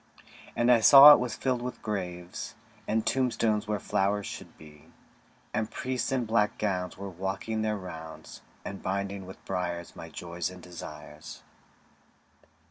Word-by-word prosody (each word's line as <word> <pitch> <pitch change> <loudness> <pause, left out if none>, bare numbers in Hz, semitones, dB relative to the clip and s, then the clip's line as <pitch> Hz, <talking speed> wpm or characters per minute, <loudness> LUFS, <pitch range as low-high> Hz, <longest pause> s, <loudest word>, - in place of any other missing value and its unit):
And 120 +1 +3
I 120 - +6
saw 140 +7 +11
it - - +4
was 125 -2 -3
filled 125 -2 -1
with 125 +1 -6
graves, 90 -2 -5 0.3
And 110 +1 0
tombstones 115 -4 +1
where 105 -1 0
flowers 100 +2 0
should - - -9
be; 75 -1 -15 0.7
And 110 0 -1
priests 130 0 -3
in 130 -3 0
black 110 -1 +1
gowns 90 -4 -2
were 100 - -6
walking 95 +5 -3
their 110 -1 0
rounds, 80 -4 -9 0.2
And 95 - -6
binding 100 0 -3
with 95 - -12
briars 85 -2 -3
my 85 - -9
joys 85 +2 -4
and 90 0 -11
desires. 75 -3 -10
100 Hz, 145 wpm, -28 LUFS, 90-110 Hz, 0.7 s, saw